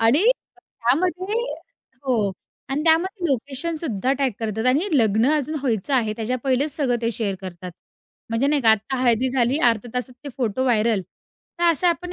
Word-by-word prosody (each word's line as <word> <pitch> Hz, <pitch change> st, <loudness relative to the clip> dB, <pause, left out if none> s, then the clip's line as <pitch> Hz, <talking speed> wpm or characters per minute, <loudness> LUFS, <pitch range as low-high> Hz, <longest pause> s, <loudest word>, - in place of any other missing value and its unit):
आणि 240 Hz, -, +4 dB, 0.3 s
त्यामध्ये 360 Hz, -, -1 dB, 0.7 s
हो 250 Hz, -4 st, +1 dB, 0.5 s
आणि 290 Hz, +3 st, -1 dB
त्यामध्ये 350 Hz, +4 st, +2 dB
लोकेशन 280 Hz, +5 st, -1 dB
सुद्धा 255 Hz, -, -1 dB
टॅग 275 Hz, -1 st, 0 dB
करतात. 220 Hz, +1 st, -2 dB
आणि 255 Hz, +4 st, +4 dB
हे -, -, -3 dB
लग्न 220 Hz, +1 st, +3 dB
अजून 305 Hz, +1 st, -1 dB
व्हायचं 245 Hz, 0 st, 0 dB
आहे. 225 Hz, -4 st, +1 dB
त्याच्या 230 Hz, +2 st, -2 dB
पहिलेच 270 Hz, +3 st, +1 dB
सगळं 255 Hz, -5 st, +1 dB
ते 230 Hz, -, +1 dB
शेअर 210 Hz, -3 st, -2 dB
करतात. 180 Hz, -1 st, -7 dB, 0.6 s
म्हणजे 230 Hz, +5 st, +1 dB
नाही 290 Hz, -2 st, +2 dB
का 225 Hz, -, +6 dB
आत्ता 220 Hz, +5 st, +1 dB
हळदी 245 Hz, +1 st, +3 dB
झाली, 255 Hz, +2 st, +2 dB
अर्ध्या 230 Hz, +1 st, -1 dB
तासात 250 Hz, 0 st, -3 dB
ते 285 Hz, -, -5 dB
फोटो 245 Hz, -1 st, -1 dB
व्हायरल. 225 Hz, -4 st, +2 dB, 0.6 s
तर 345 Hz, -, +1 dB
अशा 340 Hz, +3 st, +2 dB
आपण 355 Hz, +1 st, -2 dB
255 Hz, 175 wpm, -22 LUFS, 225-295 Hz, 0.7 s, का